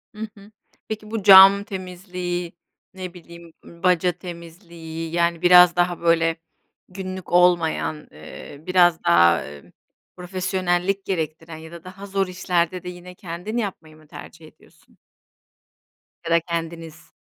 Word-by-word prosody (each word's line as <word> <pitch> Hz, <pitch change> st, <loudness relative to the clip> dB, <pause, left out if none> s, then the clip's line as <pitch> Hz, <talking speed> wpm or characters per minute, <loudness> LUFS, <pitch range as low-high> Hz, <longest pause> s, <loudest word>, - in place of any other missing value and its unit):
Hı 220 Hz, +1 st, -5 dB
hı. 200 Hz, +2 st, -16 dB, 0.4 s
Peki 215 Hz, 0 st, -7 dB
bu 220 Hz, -4 st, -3 dB
cam 195 Hz, 0 st, +9 dB
temizliği, 180 Hz, -2 st, -6 dB, 0.4 s
ne 185 Hz, -2 st, -8 dB
bileyim, 170 Hz, -1 st, -14 dB
ımm, 170 Hz, +1 st, -16 dB
baca 180 Hz, -1 st, +3 dB
temizliği, 170 Hz, -2 st, -9 dB
yani, 170 Hz, -1 st, 0 dB
biraz 180 Hz, -1 st, +7 dB
daha 175 Hz, 0 st, 0 dB
böyle 165 Hz, -1 st, +2 dB, 0.5 s
günlük 185 Hz, 0 st, -8 dB
olmayan, 175 Hz, -3 st, +2 dB
ııı, 150 Hz, 0 st, -13 dB
biraz 175 Hz, -2 st, +3 dB
daha, 85 Hz, 0 st, +4 dB
ımm, 75 Hz, 0 st, -13 dB, 0.5 s
profesyonellik 185 Hz, +1 st, -2 dB
gerektiren 160 Hz, -2 st, -4 dB
ya 160 Hz, +1 st, -12 dB
da 170 Hz, -1 st, -11 dB
daha 185 Hz, +2 st, -11 dB
zor 195 Hz, -1 st, -1 dB
işlerde 180 Hz, -1 st, -2 dB
de 180 Hz, -, -6 dB
yine 180 Hz, 0 st, -11 dB
kendin 180 Hz, +6 st, -6 dB
yapmayı 170 Hz, -8 st, -5 dB
mı 155 Hz, -, -21 dB
tercih 160 Hz, +1 st, -12 dB
ediyorsun? -, -, -24 dB, 1.3 s
Ya 165 Hz, -, -4 dB
da 170 Hz, -, +5 dB
kendiniz? 165 Hz, -1 st, -7 dB
175 Hz, 130 wpm, -22 LUFS, 165-185 Hz, 1.3 s, cam